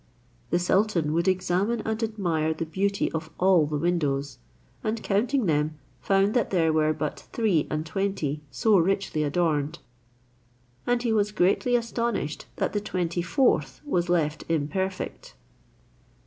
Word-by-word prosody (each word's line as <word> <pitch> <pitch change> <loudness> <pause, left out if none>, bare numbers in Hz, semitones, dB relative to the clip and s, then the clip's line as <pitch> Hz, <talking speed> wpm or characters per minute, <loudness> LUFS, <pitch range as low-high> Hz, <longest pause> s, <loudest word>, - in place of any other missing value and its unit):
The 175 - +2
sultan 180 -3 +1
would 170 +2 +1
examine 185 +5 +1
and 220 +1 -2
admire 175 -8 0
the 165 - -3
beauty 195 +5 0
of 160 0 -4
all 180 -5 +4
the 150 0 -2
windows, 145 -4 -1 0.4
and 220 +1 -1
counting 235 +5 +1
them, 155 -2 0 0.2
found 195 +1 +2
that 240 -4 +1
there 165 -4 +2
were 155 0 +3
but 155 -1 -3
three 205 -10 +1
and 155 0 -2
twenty 165 -5 -2
so 215 - +3
richly 195 -2 0
adorned, 150 0 0 1.1
and 245 0 +1
he 230 -2 +1
was 210 -1 +2
greatly 210 +5 +2
astonished 235 -9 -2
that - - -1
the 205 - 0
twenty 175 -4 -2
fourth 175 - +1
was 175 -11 0
left 155 -3 +1
imperfect. 175 - -2
175 Hz, 140 wpm, -26 LUFS, 155-205 Hz, 1.1 s, all